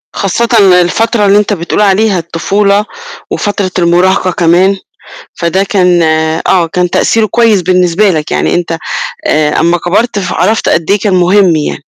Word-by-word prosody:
خاصةً 215 +5 -1 0.3
الفترة 220 +4 0
اللي 200 +1 +3
أنت 210 0 0
بتقول 175 +3 -2
عليها 200 -1 +1
الطفولة 200 +5 -1 0.4
وفترة 205 -3 -3
المراهقة 180 +2 +1
كمان، 180 +3 +1 0.6
فده 180 +3 -1
كان 180 -4 +1 0.5
آه، 175 -3 +2
كان 180 +1 -2
تأثيره 225 +4 +1
كويس 220 -2 +1
بالنسبة 180 +2 +1
لك، 155 -4 -3
يعني - - 0
أنت، 170 -1 -2 0.5
آآ، 150 -1 0
أما 170 +2 +1
كبرت 200 +5 -1
فعرفت 190 +4 -1
قد 165 +3 0
إيه 205 - +2
كان 200 -2 -1
مهم 180 -1 +2
يعني. 150 - -2
185 Hz, 145 wpm, -9 LUFS, 175-205 Hz, 0.6 s, اللي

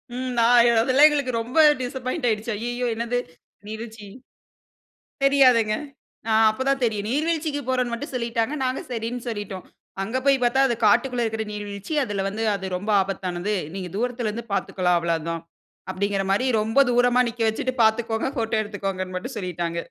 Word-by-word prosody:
ம் 255 0 -3
நா 230 - +4 0.4
அதெல்லாம் 270 +5 +6
எங்களுக்கு 285 -4 -1
ரொம்ப 245 +7 -1 0.2
டிசப்பாயிண்ட் 255 +2 -3
ஆயிடுச்சு. 220 +2 -2
"ஐய்யயோ 240 +2 -2
என்னது 235 +2 -2 0.5
நீர்வீழ்ச்சி?" 220 -1 -8 1.2
தெரியாதுங்க. 255 -6 +5 0.6
அ - - +2 0.2
அப்போ 215 - -7
தான் 275 -1 +1
தெரியும். 215 -3 0
நீர்வீழ்ச்சிக்கு 305 0 -1
போறோம்ன்னு 250 -2 0
மட்டும் 280 +5 -5
சொல்லிட்டாங்க 235 +2 -1
நாங்க 255 0 -1
சரின்னு 235 +1 -4
சொல்லிட்டோம். 205 -4 -6 0.4
அங்கே 230 +6 -2
போய் 275 -1 +5
பார்த்தா 265 +3 +3
அது 240 - 0
காட்டுக்குள்ளே 245 +3 +3
இருக்கிற 220 0 -2
நீர்வீழ்ச்சி 205 +5 -6
அதில 205 -5 -2
வந்து 220 +3 -4
அது 195 -1 -6
ரொம்ப 205 +4 -6
ஆபத்தானது. 185 +1 -3 0.2
"நீங்க 185 -2 -5
தூரத்தில 240 -1 -1
இருந்து 230 +2 -5
பார்த்துக்கலாம் 185 -2 +1
அவ்வளவு 165 -2 -1
தான்"அப்டின்கிற 185 +4 -4
மாதிரி 210 +7 +2 0.2
ரொம்ப 225 +5 +1
தூரமா 245 +1 +4
நிக்க 230 0 -8
வச்சிட்டு 255 +4 -2
பார்த்துக்கோங்க, 225 +2 +1
போட்டோ 225 -1 0
எடுத்துக்கோங்கன்னு 195 -3 -4
மட்டும் 185 +4 -6
சொல்லிட்டாங்க. 175 -3 -3
225 Hz, 150 wpm, -24 LUFS, 200-250 Hz, 1.2 s, அதெல்லாம்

